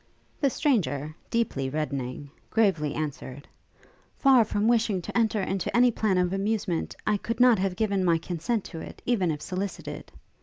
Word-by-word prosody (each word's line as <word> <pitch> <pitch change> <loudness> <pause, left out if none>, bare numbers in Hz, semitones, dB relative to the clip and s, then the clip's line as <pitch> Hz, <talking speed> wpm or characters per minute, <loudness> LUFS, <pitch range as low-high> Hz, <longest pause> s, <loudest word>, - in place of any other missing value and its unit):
The 280 - +3
stranger, 165 - 0
deeply 170 -13 0
reddening, 140 -2 -4 0.2
gravely 185 -10 +1
answered, 145 -3 -5 0.7
'Far 265 -4 +6
from 210 0 0
wishing 225 -4 +2
to 175 - -8
enter 220 -3 +2
into 195 +4 -1
any 245 0 +6
plan 215 -4 +1
of 180 0 +1
amusement, 195 -3 -1
I 210 - +2
could 230 +4 -4
not 245 -4 +6
have 190 -1 0
given 200 -2 0
my 170 -2 +3
consent 180 +7 -2
to 165 - -8
it, - - -10
even 205 -8 +1
if 150 -2 -3
solicited.' 190 +1 -5
195 Hz, 160 wpm, -27 LUFS, 155-225 Hz, 0.7 s, Far